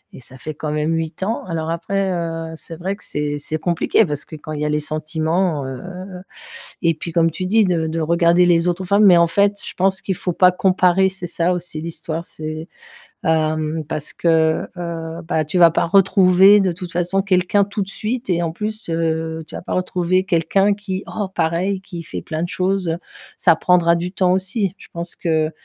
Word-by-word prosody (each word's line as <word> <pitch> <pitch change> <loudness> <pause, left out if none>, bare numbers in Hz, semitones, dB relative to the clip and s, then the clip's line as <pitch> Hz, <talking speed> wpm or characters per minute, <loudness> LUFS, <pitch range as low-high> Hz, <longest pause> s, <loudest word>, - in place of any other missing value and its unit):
et - - -10
ça 130 +1 -12
fait 155 +5 -6
quand 150 0 -4
même 150 +2 0
8 165 +3 -3
ans. 220 +4 -2
Alors 165 -2 -3
après, 195 +2 -1
heu, 165 -2 -3
c'est 165 +1 -9
vrai 185 +4 -3
que - - -14
c'est 145 0 -2
c'est 155 +2 -3
compliqué 175 +6 +2
parce 145 -3 -3
que 155 - -10
quand 155 +1 -9
il 150 -1 -4
y - - 0
a - - 0
les 150 - +1
sentiments, 155 +1 -1
heu 130 -1 -6 1.0
et 170 -2 +3
puis, 170 +2 -7
comme 165 0 +3
tu 185 +3 -4
dis, 220 +3 +4
de 170 -4 +1
de 165 +1 -2
regarder 170 +2 +3
les 175 0 +3
autres 180 +2 -1
femmes. 200 +3 +4
Mais 180 -3 +8
en 170 0 +5
fait, 200 +4 +2
je - - -5
pense 190 +1 +1
qu'il 190 - -1
faut 180 0 -3
pas 180 -1 +5
comparer. 185 0 +3
C'est 190 -2 -6
ça 175 +1 0
aussi 175 -3 -4
l'histoire, 165 0 -5
c'est, 155 +1 -6 0.6
hem, 155 -1 0
parce 155 -1 -3
que, 160 -1 +2
heu, 170 -1 -5
bah, 160 -2 -1
tu 155 - -2
vas 170 -2 +7
pas - - +1
retrouver, 195 +2 +6
de 185 -3 +1
toute 180 -1 -8
façon, 180 +3 0
quelqu'un 190 +1 +2
tout 205 +1 -4
de 190 - -2
suite 230 +5 -4
et 175 -1 +1
en 165 - -1
plus, 215 +3 -5
heu, 160 -1 -2
tu - - -10
vas - - -6
pas - - -5
retrouver 185 0 0
quelqu'un 195 +3 +2
qui 195 -1 -5
oh, 205 -3 -4
pareil, 175 +4 0
qui 175 -3 -8
fait - - -6
plein 160 0 -4
de 175 - -3
choses. 185 -3 -1 0.4
Ça 170 -3 +4
prendra 170 0 +3
du 175 +1 -3
temps 185 -2 +2
aussi. 190 +1 -1
Je - - -15
pense 170 0 -5
que 160 -2 0
170 Hz, 215 wpm, -20 LUFS, 160-190 Hz, 1.0 s, Mais